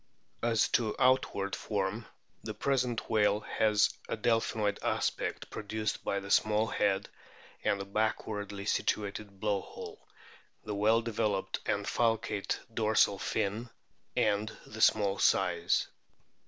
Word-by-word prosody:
As 115 -3 +3
to 110 -3 +1
outward 125 -6 +2
form 105 +1 -2 0.4
the 110 -1 -5
present 125 -1 0
whale 105 -1 +3
has 105 -1 +2 0.2
a - - -1
del 115 +1 +3
phinoid 105 -3 -1
aspect, - - -1
produced 110 0 -3
by 100 - 0
the 100 0 -7
small 110 0 +3
head 100 -3 0 0.6
and 100 - +1
the 100 - -4
backwardly 105 -1 -2
situated 100 -2 -1
blow 105 -2 0
hole, - - -10 0.5
the 105 - -4
well 110 +3 +3
developed 110 -4 -1
and - - 0
falcate 115 -4 0 0.2
dorsal 110 -3 +3
fin, 110 +7 -2 0.5
and 105 +1 +1
the 110 +1 -8
small 100 -3 +4
size. 85 -3 +2
105 Hz, 125 wpm, -31 LUFS, 100-110 Hz, 0.6 s, small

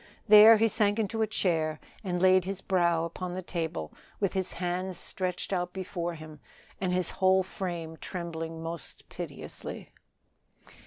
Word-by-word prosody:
There 215 +1 +10
he 225 +1 +4
sank 205 -1 +2
into 225 0 -1
a 220 - +2
chair 160 -7 0 0.2
and 180 -3 -1
laid 185 0 +5
his 195 +1 -4
brow 170 -3 +2
upon 175 +2 -5
the 185 - -4
table 160 - -4 0.3
with 195 -3 0
his 190 -1 -1
hands 180 +1 -2
stretched 185 +1 -3
out 180 -1 -1
before 175 -2 -4
him 155 -1 -11 0.4
and 185 -1 0
his 180 -1 +1
whole 190 0 +5
frame 170 -4 -5
trembling 165 -2 -5
most 165 0 -7
piteously. - - -8
180 Hz, 150 wpm, -29 LUFS, 170-190 Hz, 0.4 s, There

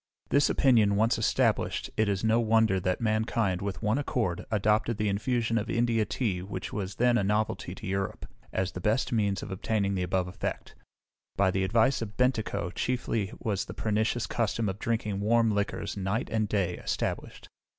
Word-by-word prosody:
This 140 0 +4
opinion 110 -7 +4
once 110 +3 +2
established, 110 - +1
it 110 -1 +2
is 100 0 -1
no 110 +1 +3
wonder 110 -3 +3
that 90 +3 -1
mankind, 110 -4 0
with 100 -1 -4
one 105 +6 +2
accord, 115 -11 -1
adopted 105 +1 +1
the 105 0 0
infusion 115 +3 0
of 105 - -5
India 115 -2 +2
tea, 100 -8 -1
which 95 0 -6
was 100 -1 -3
then 120 0 +3
a - - 0
novelty 105 -2 -1
to 110 - -9
Europe, 95 -1 -2 0.3
as 95 0 -1
the 90 - -7
best 110 +6 +1
means 100 -5 0
of - - -7
obtaining 100 +1 0
the 95 - -1
above 90 0 0
effect. 90 - -5 0.6
By 95 -1 +3
the 95 0 0
advice 115 +7 +2
of 105 -2 -6
Bentikoe 110 -7 0
chiefly 115 -3 -1
was 100 -3 -2
the - - -9
pernicious 110 +2 0
custom 115 -1 -1
of 95 +2 -5
drinking 110 -4 -1
warm 115 +2 +3
liquors, 100 0 -2
night 100 +3 -2
and 110 -2 0
day, 95 -4 0
established. - - -3
105 Hz, 180 wpm, -28 LUFS, 95-115 Hz, 0.6 s, This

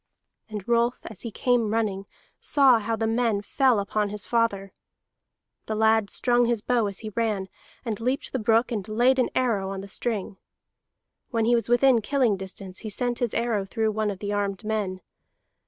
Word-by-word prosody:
And 210 -3 -6
Rolf, 235 +1 +1
as 220 - -9
he 235 - -4
came 235 -1 +1
running, 205 -3 -1 0.3
saw 265 -5 +4
how 225 +1 -2
the 225 - -1
men 225 -2 +1
fell 260 +2 +2
upon 205 +1 -1
his 210 0 -5
father. 205 -5 0 0.9
The 220 - -2
lad 220 -1 +3
strung 245 -1 +2
his 235 -3 0
bow 240 -4 +1
as 200 -1 -5
he 220 - -5
ran, 210 -5 -1 0.4
and 220 -4 -3
leaped 255 +5 -2
the 260 - -2
brook, 225 +2 +2
and 210 -4 -3
laid 245 +5 +3
an 250 - +2
arrow 220 -7 +1
on 195 0 -5
the 200 - -9
string. 205 -1 -3 0.9
When 225 -3 0
he 240 - +3
was 235 0 +1
within 245 -1 +4
killing 250 -2 +2
distance, 190 0 -8
he 220 - -6
sent 240 +3 -2
his 240 -3 -1
arrow 230 -4 0
through 220 +2 -1
one 215 0 -1
of 200 - -4
the 205 +1 -4
armed 200 0 -2
men. 210 -4 -2
220 Hz, 190 wpm, -25 LUFS, 205-240 Hz, 0.9 s, saw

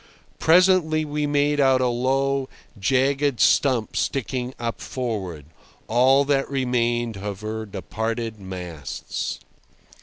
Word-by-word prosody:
Presently 165 -2 +4
we 150 0 -2
made 145 0 +1
out 135 -2 +4
a 130 - +2
low, 135 +2 0 0.3
jagged 135 +5 +1
stump 125 -6 +3
sticking 130 -1 -2
up 115 -1 -4
forward—all 115 - -1
that 140 -1 +1
remained 120 -4 0
of 100 0 -5
her 110 0 -4
departed 110 +3 -4
masts. 90 -5 -5
125 Hz, 100 wpm, -23 LUFS, 110-140 Hz, 0.3 s, Presently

